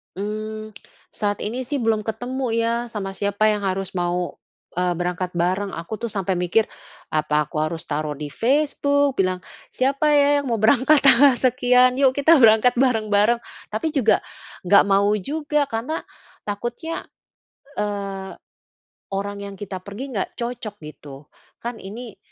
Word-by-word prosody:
Hmm, 215 Hz, +2 st, -5 dB, 0.4 s
saat 205 Hz, -1 st, -2 dB
ini 240 Hz, +5 st, -3 dB
sih 280 Hz, +3 st, -3 dB
belum 225 Hz, -2 st, +1 dB
ketemu 245 Hz, +5 st, -3 dB
ya 230 Hz, 0 st, +1 dB, 0.2 s
sama 195 Hz, -3 st, -5 dB
siapa 200 Hz, +2 st, +1 dB
yang 210 Hz, -1 st, +1 dB
harus 195 Hz, 0 st, -2 dB
mau, 175 Hz, 0 st, -1 dB, 0.4 s
eee, 180 Hz, 0 st, +1 dB
berangkat 180 Hz, +1 st, -2 dB
bareng. 185 Hz, +3 st, 0 dB
Aku 170 Hz, +6 st, -5 dB
tuh 230 Hz, 0 st, -4 dB
sampai 195 Hz, -2 st, -1 dB
mikir 180 Hz, +5 st, +1 dB, 0.4 s
apa 150 Hz, -1 st, 0 dB
aku -, -, -16 dB
harus 160 Hz, +1 st, -3 dB
taruh 150 Hz, 0 st, -2 dB
di 150 Hz, -, -4 dB
Facebook 285 Hz, -, +1 dB
bilang 185 Hz, -1 st, +1 dB, 0.3 s
,"Siapa 275 Hz, +3 st, +1 dB
ya 285 Hz, -1 st, +5 dB, 0.2 s
yang 255 Hz, -, -3 dB
mau 230 Hz, -, 0 dB
berangkat 260 Hz, +7 st, +5 dB
tanggal 275 Hz, 0 st, +6 dB
sekian, 250 Hz, 0 st, +4 dB
yuk 265 Hz, -1 st, +4 dB
kita 285 Hz, +5 st, +5 dB
berangkat 220 Hz, +3 st, +6 dB
bareng-bareng." 225 Hz, -3 st, +2 dB, 0.3 s
Tapi 220 Hz, +9 st, -1 dB
juga 230 Hz, -6 st, +4 dB, 0.5 s
nggak 200 Hz, +2 st, +7 dB
mau 200 Hz, 0 st, +3 dB
juga 295 Hz, +7 st, -1 dB
karena 240 Hz, +8 st, -3 dB, 0.4 s
takutnya, 240 Hz, +10 st, -5 dB, 0.7 s
eee, 200 Hz, -2 st, -3 dB, 0.8 s
orang 200 Hz, +1 st, -3 dB
yang 200 Hz, 0 st, -7 dB
kita 195 Hz, -3 st, -6 dB
pergi 240 Hz, +8 st, -7 dB
nggak 195 Hz, -, -3 dB
cocok 235 Hz, -3 st, -5 dB
gitu 145 Hz, -2 st, -11 dB, 0.3 s
kan 235 Hz, -1 st, -6 dB
ini 220 Hz, +3 st, -8 dB
215 Hz, 145 wpm, -22 LUFS, 195-250 Hz, 0.8 s, nggak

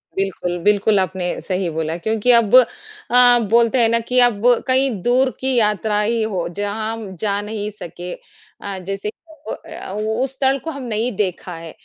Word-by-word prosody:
बिल्कुल, 190 Hz, -2 st, -2 dB
बिल्कुल 205 Hz, 0 st, +3 dB
आपने 185 Hz, -1 st, -2 dB
सही 185 Hz, -2 st, -2 dB
बोला 160 Hz, 0 st, -3 dB
क्योंकि 220 Hz, +6 st, +1 dB
अब 225 Hz, +1 st, +2 dB
अ, 250 Hz, -, +4 dB
बोलते 235 Hz, +2 st, +3 dB
हैं 225 Hz, -, +4 dB
ना 230 Hz, 0 st, +2 dB
कि 250 Hz, +2 st, +1 dB
अब 240 Hz, -5 st, +3 dB, 0.3 s
कहीं 265 Hz, +1 st, +3 dB
दूर 255 Hz, +5 st, +3 dB
की 265 Hz, 0 st, 0 dB
यात्रा 210 Hz, -2 st, +1 dB
ही 225 Hz, +2 st, 0 dB
हो, 195 Hz, -5 st, -2 dB
जहाँ 205 Hz, +4 st, -3 dB
हम 215 Hz, -4 st, -8 dB
जा 200 Hz, 0 st, 0 dB
नहीं 210 Hz, 0 st, -4 dB
सके। 180 Hz, -3 st, -8 dB, 0.5 s
अ, 200 Hz, -1 st, -5 dB
जैसे 195 Hz, +2 st, -3 dB, 0.2 s
ओ -, -, -14 dB, 0.2 s
ओ -, -, -1 dB
अ, -, -, -9 dB
वो 215 Hz, +2 st, -2 dB
उस 265 Hz, 0 st, -3 dB
स्थल 270 Hz, 0 st, +2 dB
को 320 Hz, -, -4 dB
हम 280 Hz, -3 st, -7 dB
नहीं 230 Hz, +1 st, -1 dB
देखा 185 Hz, -3 st, -2 dB
है। 165 Hz, -1 st, -9 dB
215 Hz, 185 wpm, -20 LUFS, 195-245 Hz, 0.5 s, अ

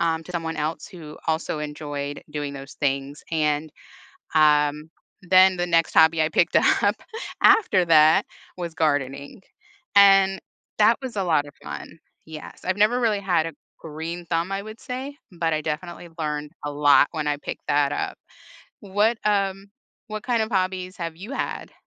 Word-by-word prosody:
um, 165 Hz, -1 st, 0 dB
to 180 Hz, -, -10 dB
someone 165 Hz, -2 st, -3 dB
else 155 Hz, +2 st, -3 dB
who 160 Hz, -5 st, -11 dB
also 160 Hz, -1 st, -1 dB
enjoyed 145 Hz, -1 st, -5 dB
doing 145 Hz, -1 st, -4 dB
those 135 Hz, 0 st, -9 dB
things, 140 Hz, 0 st, -2 dB
and, 155 Hz, -1 st, 0 dB, 0.6 s
um, 150 Hz, 0 st, +3 dB, 0.3 s
then 185 Hz, 0 st, +5 dB
the 175 Hz, -, 0 dB
next 165 Hz, -1 st, +2 dB
hobby 160 Hz, 0 st, +5 dB
I 155 Hz, -, +1 dB
picked 170 Hz, +2 st, +1 dB
up 205 Hz, +1 st, +3 dB, 0.5 s
after 200 Hz, -, +5 dB
that 155 Hz, -1 st, +5 dB, 0.3 s
was 170 Hz, -2 st, -5 dB
gardening, 145 Hz, 0 st, -1 dB, 0.5 s
and 195 Hz, -1 st, +6 dB, 0.4 s
that 220 Hz, +2 st, +5 dB
was 260 Hz, -4 st, -6 dB
a 195 Hz, -, 0 dB
lotta 145 Hz, -5 st, +1 dB
fun. 165 Hz, -, -8 dB, 0.3 s
Yes, 155 Hz, -1 st, -11 dB
I've 185 Hz, +1 st, -1 dB
never 215 Hz, +4 st, +3 dB
really 220 Hz, -4 st, +1 dB
had 175 Hz, -5 st, +1 dB
a 165 Hz, -, -7 dB, 0.3 s
green 165 Hz, +3 st, -6 dB
thumb, 170 Hz, +2 st, -1 dB
I 195 Hz, 0 st, -2 dB
would 215 Hz, +1 st, -10 dB
say, 260 Hz, +3 st, -6 dB, 0.2 s
but 165 Hz, -1 st, 0 dB
I 155 Hz, -, -1 dB
definitely 170 Hz, +3 st, -5 dB
learned 150 Hz, -1 st, -4 dB
a 145 Hz, -, -3 dB
lot 145 Hz, 0 st, +4 dB
when 155 Hz, -3 st, -3 dB
I 145 Hz, 0 st, 0 dB
picked -, -, -8 dB
that 145 Hz, -1 st, +2 dB
up. -, -, -3 dB, 0.6 s
What, 210 Hz, +3 st, +1 dB
um 195 Hz, -1 st, 0 dB, 0.4 s
what 215 Hz, -1 st, -6 dB
kind 235 Hz, -3 st, +1 dB
of 220 Hz, -, -6 dB
hobbies 185 Hz, -1 st, -2 dB
have 165 Hz, -2 st, -5 dB
you 200 Hz, +9 st, -9 dB
had? 275 Hz, -, -4 dB
165 Hz, 165 wpm, -24 LUFS, 150-195 Hz, 0.6 s, and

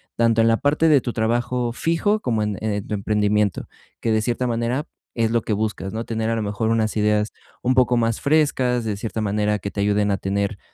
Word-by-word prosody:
tanto 115 Hz, -1 st, +3 dB
en 115 Hz, -, +4 dB
la 115 Hz, 0 st, +4 dB
parte 150 Hz, +5 st, +2 dB
de 145 Hz, -4 st, +5 dB
tu 120 Hz, -, -3 dB
trabajo 120 Hz, +2 st, 0 dB
fijo, 170 Hz, -, +1 dB
como 115 Hz, -, -1 dB
en, 105 Hz, -2 st, -2 dB
eh, 105 Hz, -2 st, -1 dB
tu -, -, -4 dB
emprendimiento, 105 Hz, -1 st, 0 dB, 0.3 s
que 115 Hz, -, -1 dB
de 110 Hz, 0 st, +2 dB
cierta 120 Hz, +3 st, -1 dB
manera 120 Hz, +4 st, -1 dB, 0.3 s
es 115 Hz, -1 st, +1 dB
lo 115 Hz, 0 st, +2 dB
que 105 Hz, -, -2 dB
buscas, 105 Hz, -2 st, -2 dB
¿no? 115 Hz, +1 st, -3 dB
Tener, 110 Hz, -1 st, -2 dB
a 115 Hz, -, +1 dB
lo 110 Hz, -, -2 dB
mejor 105 Hz, +2 st, -1 dB
unas 110 Hz, -1 st, +1 dB
ideas 105 Hz, 0 st, +1 dB, 0.3 s
un 130 Hz, -, +2 dB
poco 125 Hz, -1 st, +3 dB
más 115 Hz, -1 st, 0 dB
frescas, 135 Hz, -5 st, +2 dB
de 105 Hz, -2 st, -1 dB
cierta 110 Hz, +1 st, -4 dB
manera 105 Hz, 0 st, 0 dB
que 100 Hz, +1 st, -5 dB
te 100 Hz, -, -3 dB
ayuden 105 Hz, 0 st, +2 dB
a 100 Hz, -, +1 dB
tener, 100 Hz, +1 st, -2 dB
110 Hz, 225 wpm, -22 LUFS, 105-120 Hz, 0.3 s, de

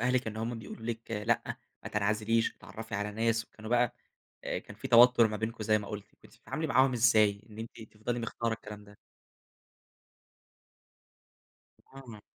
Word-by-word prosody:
أهلِك 125 Hz, 0 st, +1 dB
إن 110 Hz, -, -4 dB
هم 115 Hz, +1 st, -3 dB
بيقولوا 110 Hz, +1 st, -9 dB
لِك 115 Hz, -1 st, -5 dB
لأ، 110 Hz, +2 st, +1 dB, 0.4 s
ما -, -, -6 dB
تنعزليش، 105 Hz, +2 st, +1 dB
اتعرّفي 105 Hz, +5 st, -8 dB
على 105 Hz, +1 st, -1 dB
ناس 115 Hz, +1 st, +1 dB
وكانوا 110 Hz, 0 st, -11 dB
بقى 120 Hz, -1 st, +3 dB, 0.5 s
أ -, -, -1 dB
كان -, -, -12 dB
في -, -, -6 dB
توتُّر 120 Hz, -1 st, +7 dB
ما 105 Hz, -, -3 dB
بينكم 110 Hz, +1 st, -3 dB
زي 110 Hz, 0 st, +4 dB
ما 100 Hz, -, -7 dB
قُلتِ. 105 Hz, -1 st, -7 dB
كنتِ -, -, -18 dB
بتتعاملي 160 Hz, 0 st, -4 dB
معاهم 130 Hz, -2 st, +4 dB
إزاي 110 Hz, -4 st, +4 dB
إن 105 Hz, -, -12 dB
أنتِ 115 Hz, 0 st, -8 dB
تفضلي 115 Hz, +3 st, -3 dB
مختارة 115 Hz, 0 st, -2 dB
الكلام 105 Hz, -2 st, -10 dB
ده؟ 105 Hz, 0 st, -17 dB, 3.0 s
آه. 120 Hz, -6 st, -10 dB
110 Hz, 160 wpm, -31 LUFS, 105-120 Hz, 3.0 s, توتُّر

